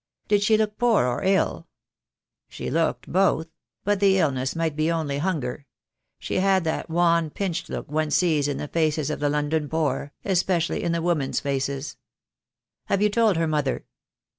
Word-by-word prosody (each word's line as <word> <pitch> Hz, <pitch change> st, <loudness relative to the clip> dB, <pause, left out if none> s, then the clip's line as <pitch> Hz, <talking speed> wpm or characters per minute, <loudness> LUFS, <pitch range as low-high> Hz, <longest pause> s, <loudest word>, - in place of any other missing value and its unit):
"Did 205 Hz, -1 st, +3 dB
she 215 Hz, +1 st, +4 dB
look 215 Hz, -1 st, -1 dB
poor 235 Hz, -, +3 dB
or 125 Hz, -1 st, -1 dB
ill?" 190 Hz, -3 st, +1 dB, 0.8 s
"She -, -, -5 dB
looked 165 Hz, +3 st, 0 dB
both 170 Hz, -3 st, +2 dB, 0.2 s
— -, -, -62 dB
but 205 Hz, 0 st, +1 dB
the 195 Hz, -1 st, +4 dB
illness 135 Hz, -6 st, 0 dB
might 165 Hz, -2 st, -1 dB
be 155 Hz, +2 st, +1 dB
only 150 Hz, -4 st, -1 dB
hunger. 145 Hz, -5 st, -2 dB, 0.5 s
She -, -, -3 dB
had 190 Hz, -1 st, +3 dB
that 160 Hz, +1 st, -2 dB
wan 170 Hz, -1 st, +2 dB
pinched 175 Hz, 0 st, -3 dB
look -, -, -5 dB
one 155 Hz, 0 st, 0 dB
sees 155 Hz, -3 st, +2 dB
in 145 Hz, -, -2 dB
the 150 Hz, -, -4 dB
faces 155 Hz, -2 st, 0 dB
of -, -, -3 dB
the 145 Hz, 0 st, +1 dB
London 150 Hz, +1 st, -1 dB
poor, 155 Hz, -2 st, -1 dB
especially 180 Hz, -3 st, +1 dB
in 170 Hz, -, -1 dB
the 170 Hz, -1 st, -1 dB
women's 165 Hz, -6 st, 0 dB
faces." 140 Hz, 0 st, -3 dB, 0.9 s
"Have 200 Hz, +1 st, +1 dB
you 210 Hz, -, +3 dB
told 220 Hz, -4 st, +3 dB
her 165 Hz, -, +1 dB
mother?" 150 Hz, -4 st, -1 dB
165 Hz, 175 wpm, -24 LUFS, 150-190 Hz, 0.9 s, she